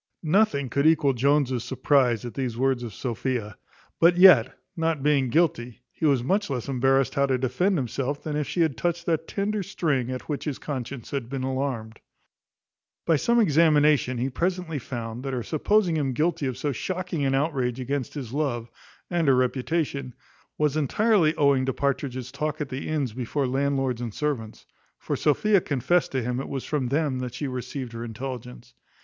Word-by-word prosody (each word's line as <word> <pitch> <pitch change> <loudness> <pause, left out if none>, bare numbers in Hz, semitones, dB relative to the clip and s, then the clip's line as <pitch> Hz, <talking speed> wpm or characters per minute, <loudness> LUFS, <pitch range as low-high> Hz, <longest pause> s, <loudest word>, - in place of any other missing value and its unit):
Nothing 160 -4 +2
could 140 +5 +1
equal 155 -4 +4
Jones's 130 -1 +1
surprize 125 -5 +2
at 120 - -6
these 125 -4 -3
words 130 -1 +1
of 120 -2 -5
Sophia; 115 -1 -3 0.4
but 175 +1 +5
yet, 175 -10 +7 0.2
not 160 -4 -1
being 140 -3 +2
guilty, 125 -6 0
he 160 - -1
was 135 -4 +2
much 200 +9 0
less 125 -4 -3
embarrassed 135 -1 +2
how 140 0 +2
to 130 -1 +1
defend 135 +10 +1
himself 135 +2 -3
than 150 -2 -3
if 150 -1 -1
she 175 - -1
had 160 -5 +2
touched 170 +6 -2
that 165 -2 0
tender 210 +1 -1
string 150 -9 -1
at 130 0 -4
which 145 -2 -3
his 150 -4 -2
conscience 130 -3 -6
had 135 -5 -3
been 135 -1 -3
alarmed. 130 -4 -3 1.1
By 165 - +4
some 235 +11 +2
examination 150 - +4
he 130 +3 -1
presently 175 0 -2
found, 115 -1 -6
that 135 0 -4
her 125 -2 -2
supposing 175 - +1
him 135 -3 0
guilty 155 +1 0
of 130 -2 -3
so 145 +2 -1
shocking 180 +3 -3
an 135 0 +2
outrage 135 -4 0
against 130 +1 -3
his 130 -5 -6
love, 125 -6 -2 0.4
and 170 -3 0
her 135 - +6
reputation, 130 0 -1 0.4
was 150 -1 +1
entirely 165 - +2
owing 140 -3 +3
to 130 - 0
Partridge's 130 -2 -2
talk 150 0 -3
at 150 -3 -3
the 130 +3 -5
inns 145 -7 -1
before 130 +3 -2
landlords 135 -2 0
and 120 -2 -3
servants; 130 -8 -3 0.3
for - - -3
Sophia 195 +6 +3
confessed 160 +5 +1
to 130 -2 0
him 125 +1 -2
it 135 - -5
was 135 -2 -4
from 145 -5 -1
them 140 -1 0
that 125 -1 -5
she 145 +3 -3
received 125 -1 -5
her 115 0 -5
intelligence. 115 - -7
135 Hz, 180 wpm, -25 LUFS, 125-155 Hz, 1.1 s, yet